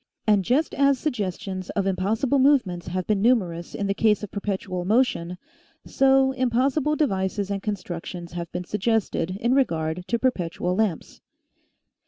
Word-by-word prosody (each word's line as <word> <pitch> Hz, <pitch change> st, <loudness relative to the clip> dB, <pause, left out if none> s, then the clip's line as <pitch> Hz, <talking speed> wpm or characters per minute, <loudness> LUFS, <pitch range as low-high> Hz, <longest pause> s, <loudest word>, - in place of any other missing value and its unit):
And 210 Hz, -3 st, +3 dB
just 275 Hz, -, +1 dB
as 280 Hz, -1 st, +3 dB
suggestions 195 Hz, -, -3 dB
of 195 Hz, -, -1 dB
impossible 210 Hz, +8 st, +1 dB
movements 250 Hz, -12 st, +2 dB
have 180 Hz, +1 st, -2 dB
been 210 Hz, -2 st, +1 dB
numer 215 Hz, -7 st, +3 dB
ous 170 Hz, 0 st, -9 dB
in 200 Hz, -, -2 dB
the 195 Hz, -, +1 dB
case 210 Hz, 0 st, +2 dB
of 210 Hz, -, -6 dB
perpetual 190 Hz, -3 st, -3 dB
motion, 185 Hz, -5 st, +1 dB, 0.5 s
so 270 Hz, 0 st, +3 dB
impossible 260 Hz, +4 st, +1 dB
devices 200 Hz, -7 st, -1 dB
and 195 Hz, -1 st, -2 dB
constructions 175 Hz, -4 st, -5 dB
have 170 Hz, -1 st, -5 dB
been 180 Hz, -, -4 dB
suggested 195 Hz, -3 st, -1 dB
in 240 Hz, +3 st, +1 dB
regard 165 Hz, -10 st, 0 dB
to 235 Hz, -, +1 dB
perpet 215 Hz, -10 st, -1 dB
ual 180 Hz, +1 st, -1 dB
lamps. 200 Hz, -6 st, -2 dB
200 Hz, 155 wpm, -24 LUFS, 180-250 Hz, 0.5 s, And